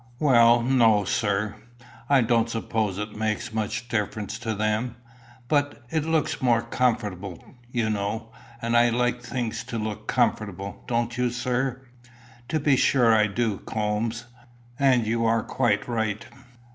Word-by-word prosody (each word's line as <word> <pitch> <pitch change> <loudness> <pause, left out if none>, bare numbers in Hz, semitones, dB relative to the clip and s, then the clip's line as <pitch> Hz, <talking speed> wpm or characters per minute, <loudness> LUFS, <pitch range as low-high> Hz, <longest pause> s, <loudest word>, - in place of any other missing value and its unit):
"Well 120 -4 +5
no, 115 -5 +4
sir. 105 +1 0 0.6
I 140 -2 +5
don't 115 0 +2
suppose 110 -3 -1
it 105 +1 -5
makes 110 0 -2
much 110 +2 -2
difference 110 -1 -2
to 115 -2 -3
them. 110 +4 -1 0.5
But 145 -3 0
it 160 -2 0
look 160 -2 0
more 120 -2 +3
comfortable, 105 -7 -2 0.2
you 120 -3 0
know. 110 +2 -2 0.3
And 115 0 0
I 120 0 +5
like 125 +1 0
things 120 -1 -3
to 115 - -4
look 110 -1 -4
comfortable. 100 -2 -1
Don't 120 0 -1
you, 125 0 +2
sir?" 125 +2 -1 0.7
"To 160 - +1
be 145 -2 +3
sure 120 -4 +4
I 105 -1 +4
do, 105 -1 -1
Coombes. 110 +2 -2 0.5
And 130 -4 +4
you 115 +1 0
are 115 0 +2
quite 125 -2 0
right. 110 -2 -2
115 Hz, 145 wpm, -25 LUFS, 110-125 Hz, 0.7 s, Well